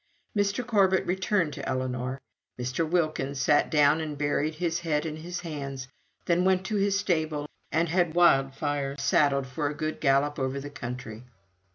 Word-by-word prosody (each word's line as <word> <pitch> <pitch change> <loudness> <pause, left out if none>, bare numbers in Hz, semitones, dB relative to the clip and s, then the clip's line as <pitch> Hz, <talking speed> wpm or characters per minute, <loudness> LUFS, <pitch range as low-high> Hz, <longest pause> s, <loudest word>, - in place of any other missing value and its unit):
Mr. 205 +4 0
Corbet 195 -5 +3
returned 190 -3 0
to 140 - -5
Ellinor. 130 0 -2 0.4
Mr. 130 +6 -1
Wilkins 155 -5 0
sat 145 +2 +3
down 150 +1 +4
and 150 -2 -4
buried 150 +2 0
his 170 0 -1
head 160 -2 -1
in 155 -1 -4
his 175 +3 -6
hands, 140 -5 -5 0.4
then 175 +1 +2
went 185 0 +2
to 215 0 -1
his 200 0 +2
stable, 155 -6 0 0.3
and 165 +2 +2
had 170 -1 +1
Wildfire 140 -3 +2
saddled 140 0 +2
for 130 +3 -2
a 150 - -5
good 155 +1 -3
gallop 140 +1 +2
over 130 +1 -1
the 145 +1 -8
country. 125 -4 -7
150 Hz, 165 wpm, -27 LUFS, 135-175 Hz, 0.4 s, down